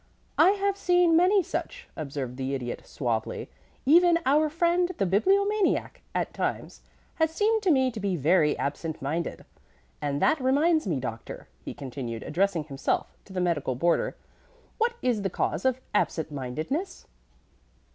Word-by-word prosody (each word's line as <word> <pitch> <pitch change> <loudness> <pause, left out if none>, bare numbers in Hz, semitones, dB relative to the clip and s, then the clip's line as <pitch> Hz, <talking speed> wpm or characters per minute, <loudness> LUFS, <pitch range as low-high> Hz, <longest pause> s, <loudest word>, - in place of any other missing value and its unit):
"I 385 - +7
have 400 -1 0
seen 355 -3 +3
many 370 +3 +5
such," - - -5
observed 140 -4 -5
the 135 +1 -2
Idiot, 120 -2 -5
suavely. 115 -4 -3 0.3
"Even 340 +4 +6
our 300 +3 +3
friend 345 +2 +2
the 195 - +1
Bibliomaniac 395 - +2
at - - -1
times - - -3 0.4
has 320 -1 +3
seemed 430 +6 +1
to 390 - +1
me 260 -4 +3
to 225 - -7
be 200 -2 -1
very 155 0 +3
absent 150 +3 -3
minded. 160 +5 -3 0.6
And 145 -1 -1
that 300 - +2
reminds 295 +2 +2
me, 155 -7 0
Doctor," 115 -3 -7 0.2
he - - -7
continued, 125 -4 -6
addressing 175 +1 0
himself 140 -2 -2
to - - -15
the 185 - -1
medical 155 -7 0
boarder. 170 +7 +1 0.6
"What 475 +2 +1
is 240 -5 +1
the 195 - -1
cause 165 - -2
of 260 -1 +2
absent 160 -6 0
mindedness?" 155 - -4
200 Hz, 150 wpm, -27 LUFS, -, 0.6 s, I